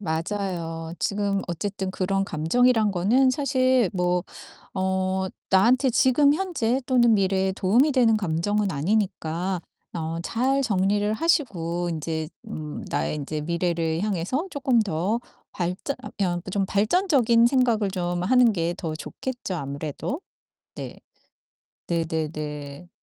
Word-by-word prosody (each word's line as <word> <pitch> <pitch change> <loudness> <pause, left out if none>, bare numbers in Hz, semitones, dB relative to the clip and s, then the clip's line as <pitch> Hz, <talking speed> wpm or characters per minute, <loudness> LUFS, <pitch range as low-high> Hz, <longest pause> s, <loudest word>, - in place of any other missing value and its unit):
맞아요. 165 -2 -3
지금 200 -1 0
어쨌든 190 +2 -3
그런 195 +1 0
감정이란 220 +8 +2
거는 235 +9 +3
사실 255 -4 +2
뭐 180 -1 +1 0.5
어 190 0 0 0.2
나한테 250 +8 +4
지금 270 +4 +4
현재 300 -9 0
또는 240 -3 +4
미래에 190 -1 +2
도움이 225 +11 +3
되는 240 -5 +4
감정은 200 +2 0
아니니까 180 +1 -1 0.3
어 165 0 -3
잘 260 +8 +1
정리를 205 -2 +1
하시고 175 - 0
인제 160 -1 -3 0.2
음 155 -8 -6
나의 - - -1
인제 150 +1 -4
미래를 165 0 -1
향해서 210 - -1
쪼끔 270 -4 +2
더 195 +3 -1 0.3
발전 180 +10 -3
아 - - -7
그냥 180 -4 0
좀 200 0 +1
발전적인 235 - +3
생각을 240 -5 +2
좀 175 -2 -2
하는 245 +4 +5
게 170 -3 -1
더 165 -5 -4
좋겠죠, 245 +5 -5
아무래도. 145 - -4 0.5
네. - - -8 0.9
네네네. 155 -2 -3
195 Hz, 255 characters per minute, -25 LUFS, 170-235 Hz, 0.9 s, 하는